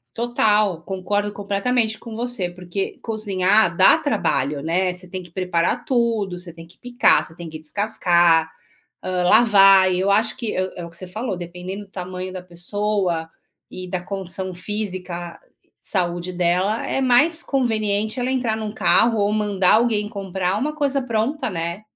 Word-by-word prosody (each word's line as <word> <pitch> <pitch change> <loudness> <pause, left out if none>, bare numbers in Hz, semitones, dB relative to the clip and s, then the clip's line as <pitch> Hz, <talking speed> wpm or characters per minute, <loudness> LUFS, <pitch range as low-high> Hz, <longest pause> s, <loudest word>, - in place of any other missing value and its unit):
Total, 215 -6 +1
concordo 205 +3 -2
completamente 215 +3 -1
com 220 0 -9
você, 235 -7 -1
porque 180 +2 -5
cozinhar 205 -4 +1
dá 190 +11 +7
trabalho, 150 - -1
né, 180 +4 0
você 180 +1 -8
tem 185 +1 -6
que 175 - -16
preparar 180 +5 -1
tudo, 230 -7 0
você 175 -1 -9
tem 165 0 -12
que 170 - -22
picar, 245 0 +3
você - - -13
tem 170 0 -9
que 155 - -7
descascar, 170 -1 +2 0.5
hã, 180 -1 -1
lavar, 195 -3 +6
e 180 - 0
eu 195 +2 +2
acho 215 +2 +1
que 230 - -4
é 185 0 -2
é 175 - -6
o - - -11
que 170 - -10
você 185 +1 -8
falou, 215 +2 -4
dependendo 180 +3 -7
do - - -33
tamanho 185 0 -6
da 185 - -6
pessoa 180 -1 -2 0.4
e 185 -1 -8
da 185 -1 -2
condição 185 0 -5
física, 180 -3 -5 0.4
saúde 175 -1 -2
dela, 180 +5 0
é - - -1
mais 290 +6 +3
conveniente 220 -4 -1
ela 250 +1 -1
entrar 245 -4 0
num 215 -1 -4
carro 225 +1 +3
ou 205 0 +1
mandar 205 -3 +2
alguém 220 -2 +2
comprar 190 -3 -2
uma 280 +8 -1
coisa 285 -2 0
pronta, 240 +3 -1
né, 170 +2 -4
195 Hz, 165 wpm, -21 LUFS, 180-220 Hz, 0.5 s, dá